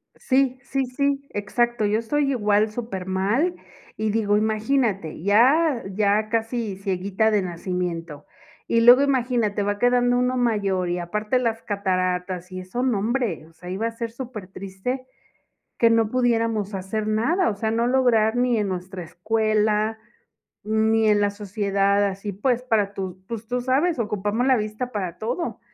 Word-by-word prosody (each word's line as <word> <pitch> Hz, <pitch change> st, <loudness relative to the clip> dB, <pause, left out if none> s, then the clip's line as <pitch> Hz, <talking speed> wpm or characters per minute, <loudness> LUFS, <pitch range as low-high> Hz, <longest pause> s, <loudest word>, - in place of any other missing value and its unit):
Sí, 260 Hz, -1 st, +1 dB
sí, 270 Hz, -1 st, -1 dB
sí, 280 Hz, +2 st, -1 dB
exacto 230 Hz, +2 st, 0 dB
yo 210 Hz, +2 st, +1 dB
estoy 275 Hz, +4 st, 0 dB
igual, 210 Hz, -3 st, +2 dB
supermal, 210 Hz, -, -1 dB, 0.4 s
y 220 Hz, 0 st, -1 dB
digo, 210 Hz, -2 st, +2 dB
imagínate, 215 Hz, -, 0 dB
ya 255 Hz, +7 st, +4 dB
ya 210 Hz, +2 st, +1 dB
casi 225 Hz, -3 st, -2 dB
cieguita 195 Hz, +2 st, 0 dB
de 210 Hz, -, +2 dB
nacimiento, 175 Hz, -3 st, -4 dB, 0.4 s
y 230 Hz, 0 st, +2 dB
luego, 245 Hz, +3 st, +8 dB
imagínate, 245 Hz, -7 st, +1 dB
va 205 Hz, 0 st, -1 dB
quedando 245 Hz, 0 st, +3 dB
uno 250 Hz, +1 st, +1 dB
mayor, 200 Hz, -6 st, 0 dB
y 175 Hz, 0 st, -1 dB
aparte 210 Hz, +8 st, -1 dB
las 230 Hz, -2 st, -1 dB
cataratas, 185 Hz, -2 st, -2 dB
y 185 Hz, -, -5 dB
eso, 185 Hz, +7 st, -4 dB
nombre, 235 Hz, -5 st, -1 dB
o 165 Hz, -, -21 dB
sea, 180 Hz, +2 st, -11 dB
iba 200 Hz, +5 st, -2 dB
a -, -, -3 dB
ser 230 Hz, 0 st, -5 dB
supertriste 220 Hz, 0 st, -6 dB, 0.7 s
que 230 Hz, -, +5 dB
no 225 Hz, -1 st, +3 dB
pudiéramos 230 Hz, -4 st, 0 dB
hacer 195 Hz, +3 st, -3 dB
nada, 255 Hz, -, +1 dB
o 205 Hz, -, -3 dB
sea 220 Hz, +2 st, -2 dB
no 230 Hz, +2 st, +1 dB
lograr 245 Hz, -4 st, +3 dB
ni 245 Hz, -1 st, +2 dB
en 210 Hz, -2 st, 0 dB
nuestra 185 Hz, 0 st, -5 dB
escuela, 215 Hz, +3 st, 0 dB, 0.7 s
ni 220 Hz, +1 st, +2 dB
en 210 Hz, -1 st, +4 dB
la 205 Hz, 0 st, +2 dB
sociedad 200 Hz, -1 st, 0 dB
así, 195 Hz, +1 st, -4 dB
pues, 245 Hz, +5 st, 0 dB
para 210 Hz, -5 st, 0 dB
tú, 190 Hz, -1 st, -5 dB
pues, 230 Hz, -1 st, -6 dB
tú 245 Hz, +1 st, -1 dB
sabes 275 Hz, +4 st, +1 dB
ocupamos 210 Hz, +2 st, -1 dB
la 260 Hz, -, +5 dB
vista 215 Hz, +4 st, -4 dB
para 185 Hz, -6 st, -4 dB
todo. 245 Hz, +10 st, -3 dB
215 Hz, 155 wpm, -23 LUFS, 200-245 Hz, 0.7 s, luego